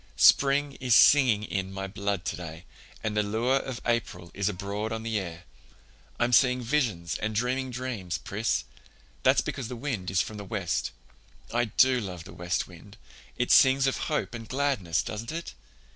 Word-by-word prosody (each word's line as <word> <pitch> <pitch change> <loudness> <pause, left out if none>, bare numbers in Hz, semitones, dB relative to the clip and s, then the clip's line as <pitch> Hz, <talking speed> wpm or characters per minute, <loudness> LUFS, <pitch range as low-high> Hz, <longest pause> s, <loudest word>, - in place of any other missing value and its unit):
"Spring 140 0 +4
is 125 -3 +4
singing 125 -8 +6
in 95 -2 -3
my 95 0 -4
blood 100 -1 -3
today, 80 0 -6 0.4
and 110 -1 -2
the 105 - +3
lure 115 +6 +1
of 130 -2 -4
April 105 -7 -2
is 100 0 0
abroad 100 +3 -4
on 110 0 -3
the 110 -2 -1
air. 85 -2 -7 0.8
I'm 120 +1 +1
seeing 125 0 +4
visions 115 - 0
and 110 0 -2
dreaming 130 +3 0
dreams, 120 -9 -4
Pris. 105 +4 -1 0.6
That's - - +4
because 135 -5 -4
the 125 - -6
wind 115 -8 -3
is 95 -1 +1
from 110 - -8
the 105 - -6
west. 100 -4 -2 0.6
I 120 +1 +2
do 130 +3 +3
love 90 -6 -6
the - - -12
west 90 +1 -2
wind. 95 +4 -14 0.4
It 125 - 0
sings 135 0 +6
of 135 - +1
hope 150 - -1
and 115 -1 -8
gladness, 130 - 0
doesn't 110 +4 -5
it? 165 +1 -5
110 Hz, 175 wpm, -28 LUFS, 95-125 Hz, 0.8 s, singing